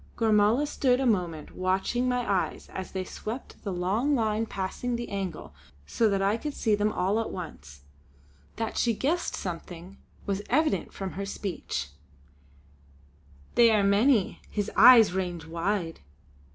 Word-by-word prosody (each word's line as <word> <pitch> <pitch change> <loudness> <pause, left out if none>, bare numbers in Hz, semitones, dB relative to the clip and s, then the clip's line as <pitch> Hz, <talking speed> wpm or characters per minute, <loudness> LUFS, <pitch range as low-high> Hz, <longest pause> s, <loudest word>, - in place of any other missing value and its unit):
Gormala 220 +4 +3
stood 260 -3 +1
a 270 - 0
moment 175 -9 -1
watching 190 +7 0
my 250 -1 -1
eyes 195 -3 -1
as 190 - -6
they 190 -1 -3
swept 220 +6 -7
the 200 - -3
long 200 +11 0
line 220 -2 0
passing 200 +6 -3
the 235 0 -4
angle 195 -4 -5 0.3
so 225 - +1
that 195 -1 0
I 200 +3 +2
could 295 +4 -5
see 220 - +1
them 210 +1 +2
all 200 +1 0
at 225 - -2
once. 75 - -9 0.7
That 225 0 -3
she 235 -2 +2
guessed 320 +10 -1
something 175 +1 -7 0.3
was 200 0 -1
evident 305 +5 +1
from 190 -2 -5
her 195 +5 -5
speech: 175 - -4 1.6
"They 235 -1 +6
are 215 -2 +3
many; 205 +2 +3
his 205 0 -2
eyes 230 -2 +8
range 175 -3 -3
wide!" 170 +1 -2
205 Hz, 150 wpm, -27 LUFS, 185-235 Hz, 1.6 s, eyes